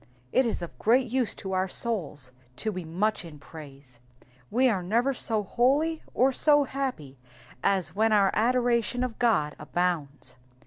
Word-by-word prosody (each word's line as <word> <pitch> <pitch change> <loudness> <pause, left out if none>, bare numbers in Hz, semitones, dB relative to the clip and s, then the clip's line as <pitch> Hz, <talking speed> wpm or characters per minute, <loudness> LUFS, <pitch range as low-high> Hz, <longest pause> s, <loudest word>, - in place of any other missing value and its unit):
It 260 -1 +3
is 220 - -3
of 170 - -9
great 245 +2 +2
use 255 -3 +1
to 190 - -7
our 185 0 +1
souls 165 - -2 0.2
to 215 - -2
be 185 -3 -5
much 190 +6 -1
in 160 -3 -11
praise; 140 -4 -13 0.5
we 255 +4 +3
are 205 -7 +1
never 235 +9 +1
so 220 -4 -1
holy 280 - +1
or 260 +2 +4
so 290 +2 +4
happy 255 - -5 0.4
as 190 -5 +1
when 220 +3 +2
our 200 -2 +4
adoration 245 +1 +1
of 250 -3 -4
God 185 -12 +2
abounds. 150 -5 -3
215 Hz, 155 wpm, -27 LUFS, 165-245 Hz, 0.5 s, or